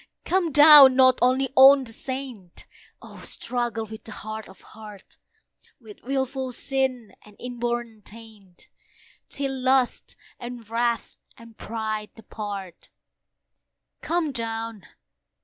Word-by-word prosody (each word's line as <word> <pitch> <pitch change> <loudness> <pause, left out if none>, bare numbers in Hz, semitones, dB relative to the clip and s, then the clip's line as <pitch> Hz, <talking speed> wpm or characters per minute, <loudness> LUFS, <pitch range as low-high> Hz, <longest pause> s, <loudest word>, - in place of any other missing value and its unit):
Come 360 -3 0
down! 290 -2 +9
not 260 -1 +4
only 255 +2 +2
on 270 +1 +7
the 225 -3 -9
saint, 255 -9 -8 0.4
Oh! - - -13
struggle 240 -2 -4
with 220 0 -11
the 225 - -10
hard 215 0 -8
of 190 - -16
heart, 210 -3 -14 0.6
With 220 -4 -15
wilful 265 0 -3
sin 260 -3 -3
and 210 -1 -18
inborn 240 -2 -5
taint, 210 -4 -16 0.6
Till 275 -1 -4
lust, 260 -1 0 0.2
and 240 -2 -9
wrath, 235 +1 -2 0.2
and 230 -1 -16
pride 215 -1 -5
depart. 205 -5 -9 1.1
Come 335 -3 -1
down! 225 -4 -6
235 Hz, 115 wpm, -24 LUFS, 220-265 Hz, 1.1 s, down